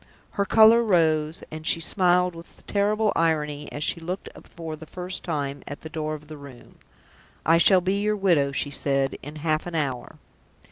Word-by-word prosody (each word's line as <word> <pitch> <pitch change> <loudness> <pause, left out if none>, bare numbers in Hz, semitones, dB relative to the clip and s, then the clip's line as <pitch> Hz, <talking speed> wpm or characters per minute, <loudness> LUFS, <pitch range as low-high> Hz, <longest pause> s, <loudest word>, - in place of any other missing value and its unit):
Her 200 - -1
color 220 +3 +6
rose, 160 -6 +1
and 155 0 -7
she - - +3
smiled 180 +1 +3
with 165 0 -13
a - - -19
terrible 210 +1 +1
irony 150 -3 -1
as 145 - -5
she 170 - 0
looked 180 +4 -5 0.2
for 165 -2 -8
the 155 +1 -12
first 180 +2 -6
time 145 -4 -3
at 145 - -7
the 160 - -8
door 155 -1 -3
of 150 0 -13
the 155 0 -9
Room. 140 -4 -14 0.7
"I 165 +1 +5
shall 185 +1 +6
be 190 +3 -1
your 210 0 +1
widow," 170 -9 +2
she 140 +1 -2
said, 135 -1 0
"in 145 +2 -9
half 155 +1 -1
an 175 - -6
hour!" 135 -6 -3
160 Hz, 190 wpm, -24 LUFS, 150-180 Hz, 0.7 s, color